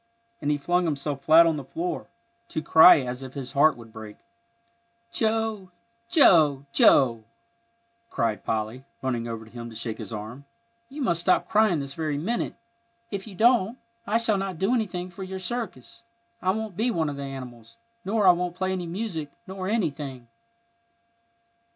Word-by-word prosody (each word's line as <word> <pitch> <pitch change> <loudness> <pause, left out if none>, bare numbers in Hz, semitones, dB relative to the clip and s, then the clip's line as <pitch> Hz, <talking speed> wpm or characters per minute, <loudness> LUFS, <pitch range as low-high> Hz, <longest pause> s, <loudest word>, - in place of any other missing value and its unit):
and 145 - -1
he 150 - +2
flung 175 +5 +1
himself 145 -2 -2
flat 160 +3 +7
on 165 -2 +1
the 140 - -5
floor, 345 - -4 0.4
to - - -3
cry 160 0 +7
as 125 0 -5
if 130 0 -9
his 135 -2 -5
heart 150 +1 +4
would 115 -2 -13
break. 110 -2 -10 0.9
"Joe, 220 -4 -1 0.4
Joe," 140 - +4 0.9
cried 110 -2 -1
Polly, 110 +4 -3 0.2
running 120 -3 -2
over 115 -1 -6
to 110 - -17
him 120 -1 -8
to 115 - -12
shake 110 0 -4
his - - -7
arm, 110 +6 -7 0.4
"you 285 +1 -5
must 170 -7 +1
stop 180 +1 +2
crying 215 -6 +3
this 140 0 -7
very 155 -2 -2
minute. 225 +11 -2 0.6
If 200 0 -5
you 200 - -10
don't, 230 +1 +3 0.3
I 215 - +2
shall 225 -3 +1
not 190 -3 -4
do 195 +8 +1
anything 185 -6 -2
for 190 - -11
your 190 0 -5
circus. 210 - -6 0.4
I 185 - 0
won't 215 -1 -2
be 225 +6 +1
one 165 -8 0
of 145 -1 -4
the - - -5
animals, 130 - -9 0.3
nor 210 +1 +1
I 185 - +9
won't 175 0 -2
play 185 +1 -1
any 180 -2 -3
music, 170 -5 -4 0.2
nor 190 -1 -6
anything." 145 - -3
165 Hz, 170 wpm, -26 LUFS, 135-195 Hz, 0.9 s, I